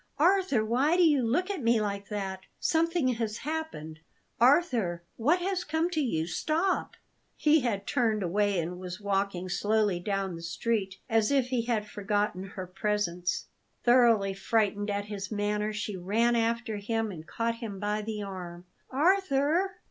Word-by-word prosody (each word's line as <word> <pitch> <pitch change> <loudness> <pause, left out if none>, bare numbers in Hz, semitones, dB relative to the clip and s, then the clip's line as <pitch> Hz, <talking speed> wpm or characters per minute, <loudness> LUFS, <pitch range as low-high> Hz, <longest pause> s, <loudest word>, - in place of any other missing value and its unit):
Arthur, 350 - +3
why 270 +9 +2
do 360 - +5
you 300 -5 +4
look 320 - +1
at 380 -7 -4
me 230 -1 +3
like 200 -1 -3
that? 190 -3 -4
Something 330 -3 +2
has 225 -3 -2
happened! 290 - -5 0.4
Arthur, 240 - +3
what 295 +10 +3
has 370 0 -1
come 320 +2 0
to 320 - 0
you? 160 - 0
Stop!" 320 - -1 0.4
He 305 +1 +4
had 215 -7 -2
turned 225 -6 +1
away, 200 +2 +1
and 175 +2 -4
was 185 0 -6
walking 195 -2 -1
slowly 205 +1 +1
down 195 -1 -2
the 165 - -8
street, 195 +3 -2
as 225 -3 +2
if 270 -3 +2
he 245 -3 0
had 225 -3 0
forgotten 205 -2 -1
her 195 -1 -7
presence. 185 -2 -1 0.4
Thoroughly 235 -5 +4
frightened 205 0 0
at 200 0 -1
his 200 -2 -6
manner, 210 0 -1
she 210 -1 -4
ran 220 +6 +1
after 230 -1 0
him 225 +1 -2
and 160 -3 -9
caught 230 0 -2
him 215 -5 -6
by 210 +1 -1
the 210 -1 -4
arm. 180 -3 -7 0.2
"Arthur!" 340 +3 +2
215 Hz, 160 wpm, -29 LUFS, 195-260 Hz, 0.4 s, do